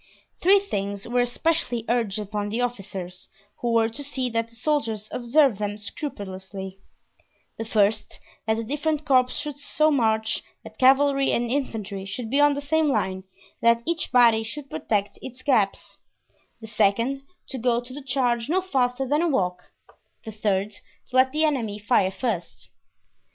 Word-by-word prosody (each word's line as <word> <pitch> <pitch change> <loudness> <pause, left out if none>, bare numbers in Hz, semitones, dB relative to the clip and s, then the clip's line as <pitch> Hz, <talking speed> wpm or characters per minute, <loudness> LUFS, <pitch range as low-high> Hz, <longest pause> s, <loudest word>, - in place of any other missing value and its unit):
Three 390 +3 +6
things 200 - -4
were 245 +1 +1
especially 245 -1 0
urged 230 -4 0
upon 205 0 -3
the 225 +3 -2
officers, 195 -7 -4 0.3
who 240 - -1
were 225 -1 +4
to 275 +6 -5
see 260 -3 -2
that 230 0 -1
the 230 - -17
soldiers 225 -5 -1
observed 250 -2 +3
them 205 0 -2
scrupulously: 195 -4 -7 0.8
the 225 - -3
first, 215 -1 +1 0.3
that 220 0 +2
the 230 - -2
different 300 +4 -1
corps 255 -3 +4
should 295 0 -5
so 305 +2 +2
march 220 -5 +1 0.2
that - - -13
cavalry 275 +1 +4
and 240 0 0
infantry 215 -8 -3
should 220 +4 -5
be 280 - +3
on 290 -1 +5
the 285 - -3
same 310 +1 +2
line 190 -6 -1 0.4
and 235 0 +5
that 235 - -20
each 335 0 -1
body 235 -3 +6
should 270 +5 -7
protect 205 -2 -1
its 255 0 -9
gaps; 220 -9 +1 0.6
the 225 - -10
second, 225 +5 +1 0.3
to 265 - -5
go 235 0 +2
to 245 +1 -10
the 290 - -7
charge 250 -2 0
no 360 +4 +3
faster 265 -7 0
than 295 +4 +2
a 345 - +2
walk; 180 - -1 0.5
the 220 - -5
third, 205 -1 0 0.4
to 255 - -8
let 260 0 +5
the 310 +2 +2
enemy 235 -9 -1
fire 205 -2 +2
first. 190 -2 -4
235 Hz, 165 wpm, -25 LUFS, 210-275 Hz, 0.8 s, Three